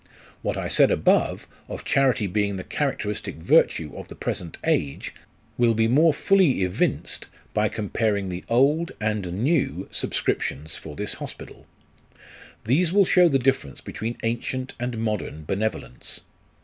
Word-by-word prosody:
What - - -2
I - - -2
said - - +5
above, - - +2 0.2
of - - -7
charity 135 -5 +3
being 100 +1 0
the 95 - -5
characteristic 105 -8 -2
virtue 80 -1 +2
of - - -8
the - - -10
present 85 -3 -4
age, 70 -1 -1 0.5
will 115 -2 +4
be 110 0 +3
more 155 +7 +5
fully 165 - +3
evinced 90 -1 -1 0.3
by - - +2
comparing 105 -2 -1
the 90 0 -5
old 145 +8 +3
and 105 -4 -1
new 155 +2 +1
subscriptions 80 +3 -1
for 75 -2 -8
this 105 +5 -3
hospital. - - -9 1.0
These 160 +9 +3
will 200 +1 +5
show 180 -1 +5
the 135 - +3
difference 130 - 0
between 115 +2 -5
ancient 125 +3 -2
and 125 -1 -3
modern 105 -8 -3
benevolence. 95 - -3
115 Hz, 140 wpm, -24 LUFS, 95-135 Hz, 1.0 s, said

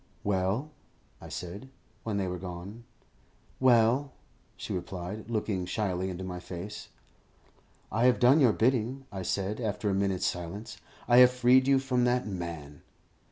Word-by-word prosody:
"Well?" 100 +9 0 0.5
I - - -10
said, 100 +9 -7 0.3
when 110 -3 -2
they 95 -2 -1
were 90 0 -4
gone. 95 +6 -8 0.7
"Well?" 125 +2 +4 0.4
she - - -5
replied, 90 +4 -6
looking 105 -5 -2
shyly 95 -1 -1
into 95 0 -5
my 90 -1 -5
face. 95 +4 -7 1.0
"I 115 +3 +2
have 125 -1 +5
done 130 +5 +5
your 130 -6 +6
bidding," 125 +3 0
I 95 -2 -5
said, 100 +5 -2
after 105 -2 -1
a - - 0
minute's 95 -1 0
silence. 90 +5 -4 0.3
"I 120 - +5
have 125 0 +9
freed 125 +1 +4
you 135 -1 +5
from 125 -2 +1
that 125 +1 +1
man." 85 -7 -6
105 Hz, 150 wpm, -29 LUFS, 90-125 Hz, 1.0 s, have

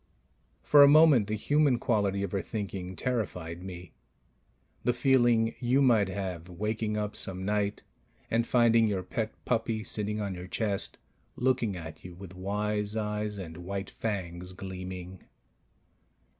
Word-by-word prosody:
For 145 - +7
a 140 - +10
moment 145 -7 +6
the 110 - -1
human 145 +3 +3
quality 100 -4 +1
of 100 - -3
her 100 - 0
thinking 95 -4 -5
terrified 90 -9 -3
me... 90 -2 -9 0.9
the 125 - +2
feeling 120 -3 +3
you 125 +2 +2
might 115 -7 +4
have 95 -3 -4
waking 105 +4 -2
up 105 0 -2
some 95 -1 -4
night 105 0 -1 0.5
and 115 +1 +2
finding 115 -2 +4
your 95 -3 -1
pet 110 +4 -3
puppy 110 -1 0
sitting 105 0 -2
on 100 -2 -2
your 90 0 -7
chest, 100 0 -2 0.4
looking 125 -5 +1
at 80 -2 -9
you 90 -1 -9
with 95 0 -10
wise 105 +2 -2
eyes 105 -1 -2
and 85 -4 -7
white 95 +3 -5
fangs 90 -4 -4
gleaming 95 -1 -7
105 Hz, 145 wpm, -29 LUFS, 95-115 Hz, 0.9 s, a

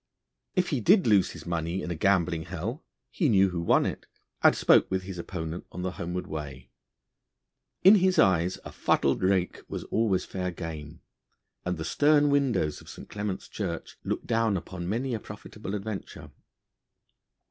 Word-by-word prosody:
If 180 -2 +1
he 140 -6 -1
did 190 - +5
lose 105 -4 +4
his - - -10
money 85 +1 -2
in 90 - -4
a - - -2
gambling 85 -2 +1
hell, 95 - -5 0.3
he 160 -7 +1
knew 95 -3 +4
who 85 -1 -2
won 85 - +3
it, - - -4 0.3
and - - +6
spoke - - +4
with 95 0 -1
his 90 -2 -7
opponent 85 -1 -5
on 90 - -6
the 95 - -1
homeward 90 +1 -4
way. 70 -5 -7 1.1
In 190 - +9
his 185 -2 +4
eyes 90 -1 +3
a - - -7
fuddled 70 - +1
rake 95 -1 +1
was - - -4
always 110 -5 0
fair 90 -1 -3
game, 80 -3 -7 0.6
and 90 -1 -1
the 80 - -4
stern 145 +3 +4
windows 130 - +1
of - - -14
St. - - -10
Clement's 105 -2 -4
Church 90 -6 -5
looked - - -3
down 115 -3 +1
upon 90 0 -6
many 125 +5 -1
a 115 - -2
profitable 105 0 -8
adventure. 105 0 -6
95 Hz, 170 wpm, -28 LUFS, 85-110 Hz, 1.1 s, In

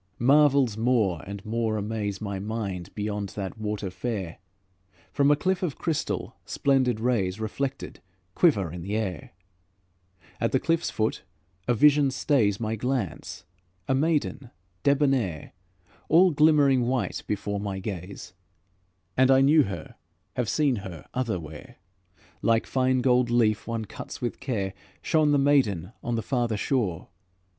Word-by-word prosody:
Marvels 135 -3 +4
more 110 -8 +1
and 100 0 -7
more 110 0 -1
amaze 105 -1 -3
My 100 -3 -4
mind 100 -4 -4
beyond 105 -1 -3
that 100 +1 -5
water 105 -3 -3
fair: 95 -3 -4 0.7
From 140 0 +3
a 145 - +6
cliff 185 +5 0
of 170 -7 -2
crystal, 165 -3 -2
splendid 130 -5 +1
rays, 110 -5 0
Reflected, 135 +5 -4 0.3
quiver 100 - +3
in 90 - -6
the 100 +5 -3
air. 95 -8 -4 1.1
At 115 - 0
the 130 - +4
cliff's 165 +5 0
foot 110 0 -1 0.5
a 120 - +3
vision 145 +3 +5
stays 125 -7 +1
My 110 -1 -2
glance, 120 - -3 0.4
a - - +2
maiden 145 -3 0 0.3
debonaire, 135 - +1 0.6
All 180 +3 +6
glimmering 145 -5 +4
white 130 -1 -1
before 100 -1 -2
my 100 -1 -4
gaze; 95 -2 -7 0.8
And 130 0 +4
I 135 0 +6
know 150 +3 +6
her, 100 - -7 0.4
have 125 -4 -1
seen 145 -5 +2
her 95 -5 -8
otherwhere. 90 - -4 0.7
Like 115 -1 +2
fine 130 -1 +1
gold 125 -1 +3
leaf 110 -3 +2
one 115 -1 -3
cuts - - -8
with 120 - -3
care, 100 -8 -2 0.3
Shone 155 -2 +3
the 145 - +4
maiden 125 - +2
on 120 - -2
the 115 - -2
farther 120 -5 0
shore. 100 - -1
115 Hz, 140 wpm, -26 LUFS, 100-135 Hz, 1.1 s, a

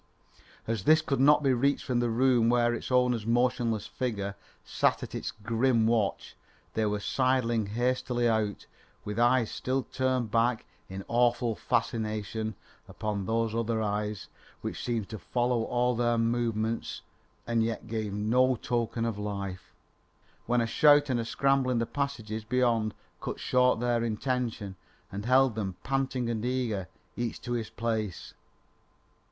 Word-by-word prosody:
As 110 -4 -2
this 155 0 +6
could 140 -4 -1
not 150 +2 +5
be 135 -2 +4
reached 140 +3 +1
from 125 -2 0
the 120 -1 +1
room 120 0 +3
where 120 0 +3
its 120 - -5
owner's 125 -3 +3
motionless 120 -2 +1
figure 100 -6 -3 0.3
sat - - +1
at - - -7
its - - -3
grim 115 +2 +1
watch, 110 -3 0 0.4
they 110 -1 +1
were 105 0 -1
sidling 120 -2 +1
hastily 120 +2 0
out, 110 -3 0 0.4
with 105 +2 -3
eyes 120 -1 +3
still 130 +1 -1
turned 130 -4 -1
back 115 0 +1 0.2
in 95 +1 -7
awful 120 -1 +2
fascination 110 -2 -2 0.3
upon 105 -3 -3
those 115 0 0
other 115 0 0
eyes 105 -1 -2 0.3
which - - -5
seemed 115 -4 -1
to 110 - -6
follow 120 0 0
all 125 0 +1
their 120 0 +1
movements 115 -1 -1 0.4
and 115 -1 +1
yet 115 -1 -3
gave 110 -2 -3
no 120 +6 +2
token 115 -1 -1
of 110 -3 -2
life, 100 -3 -5 0.8
when 120 0 +2
a - - +1
shout 145 +4 +5
and 115 -2 -1
scramble 135 0 +2
in 125 - +1
the 115 - +1
passages 115 -6 -3
beyond 115 -2 +1 0.3
cut - - -4
short 125 -2 +3
their 120 -1 +1
intent 120 +1 -1 0.5
and 100 +2 -5
held 130 -1 +5
them 100 -4 -3
panting 135 -2 -1
and 115 -2 -2
eager, 120 -7 -1 0.3
each 120 -1 -3
to 120 - -7
his 115 -2 -2
place. 110 -4 -3
115 Hz, 150 wpm, -29 LUFS, 110-125 Hz, 0.8 s, this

